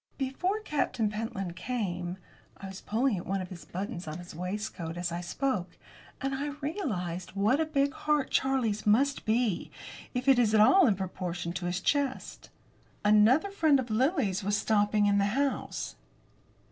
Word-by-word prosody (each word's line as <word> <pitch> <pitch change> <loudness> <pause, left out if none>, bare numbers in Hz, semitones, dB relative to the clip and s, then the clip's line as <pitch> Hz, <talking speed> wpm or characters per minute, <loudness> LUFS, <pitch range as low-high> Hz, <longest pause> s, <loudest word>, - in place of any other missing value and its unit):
"Before 315 +10 -1
Captain 260 - 0
Pentland 210 -5 -4
came" 180 -7 -3 0.4
I - - -9
was 190 0 -8
pulling 230 0 +1
at 175 - -7
one 195 +1 0
of 185 -1 -5
the 170 -5 -10
buttons 190 -1 -4
on 155 +1 -4
his 175 0 -10
waistcoat 180 -1 -4
as 175 0 -2
I 170 +1 -3
spoke, 195 0 -2 0.4
and 275 0 -2
I 285 +2 -2
realised 185 - -3
what 215 +8 +3
a 320 - +1
big 280 -2 +1
heart 300 -3 0
Charlie's 245 -6 +1
must 270 +7 +3
be, 220 -4 +1 0.5
if 250 +2 -2
it 265 -2 +6
was 220 -3 +3
at - - +5
all 355 - +7
in 210 - +3
proportion 180 -2 -4
to 175 0 -3
his 180 +1 -1
chest 280 +1 -1 0.6
"another 220 - +5
friend 315 -8 +4
of 245 -3 -4
Lily's 220 - +1
was 205 +1 +1
stopping 210 -1 +2
in 200 0 +3
the 200 - +3
house." 280 -1 -2
215 Hz, 170 wpm, -29 LUFS, 185-270 Hz, 0.6 s, all